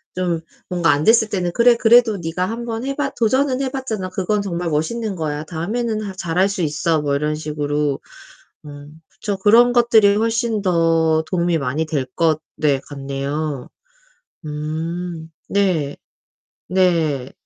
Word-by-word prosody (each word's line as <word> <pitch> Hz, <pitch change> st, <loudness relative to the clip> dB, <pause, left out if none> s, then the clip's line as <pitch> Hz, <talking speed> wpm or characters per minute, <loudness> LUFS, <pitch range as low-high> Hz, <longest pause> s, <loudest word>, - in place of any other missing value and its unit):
좀 175 Hz, -3 st, -1 dB, 0.3 s
뭔가 175 Hz, -2 st, +1 dB
안 145 Hz, +2 st, 0 dB
됐을 225 Hz, -1 st, +5 dB
때는 180 Hz, -4 st, -1 dB
"그래 240 Hz, 0 st, +5 dB
그래도 230 Hz, -2 st, +5 dB
네가 175 Hz, +1 st, -2 dB
1 235 Hz, +1 st, -5 dB
번 225 Hz, 0 st, -4 dB
해 275 Hz, -, -1 dB
봤 275 Hz, -1 st, -2 dB
도전은 260 Hz, +3 st, +1 dB
해 270 Hz, -, -1 dB
봤잖아. 220 Hz, -9 st, -4 dB
그건 195 Hz, +3 st, -1 dB
정말 175 Hz, -3 st, -3 dB
멋있는 195 Hz, +7 st, -2 dB
거야. 150 Hz, -2 st, -3 dB
다음에는 215 Hz, +7 st, -2 dB
하 200 Hz, -2 st, -5 dB
잘할 185 Hz, +1 st, 0 dB
수 200 Hz, -2 st, -3 dB
있어." 155 Hz, 0 st, 0 dB
뭐 140 Hz, -1 st, 0 dB
이런 150 Hz, +1 st, -1 dB
식으로. 150 Hz, -2 st, -2 dB, 0.7 s
음. 145 Hz, +2 st, -12 dB
그쵸. 205 Hz, -2 st, -5 dB
그런 230 Hz, +5 st, +5 dB
것들이 225 Hz, -4 st, +5 dB
훨씬 225 Hz, 0 st, 0 dB
더 165 Hz, -3 st, +2 dB
도움이 175 Hz, -2 st, +1 dB
많이 145 Hz, +3 st, -1 dB
될 150 Hz, -4 st, -1 dB
것 160 Hz, -2 st, +2 dB, 0.2 s
네. 145 Hz, -3 st, +2 dB
같네요. 140 Hz, 0 st, -4 dB, 0.8 s
음. 160 Hz, +2 st, -4 dB, 0.2 s
네. 175 Hz, -8 st, 0 dB, 0.7 s
네. 165 Hz, -8 st, +1 dB
175 Hz, 260 characters per minute, -20 LUFS, 155-215 Hz, 0.8 s, 됐을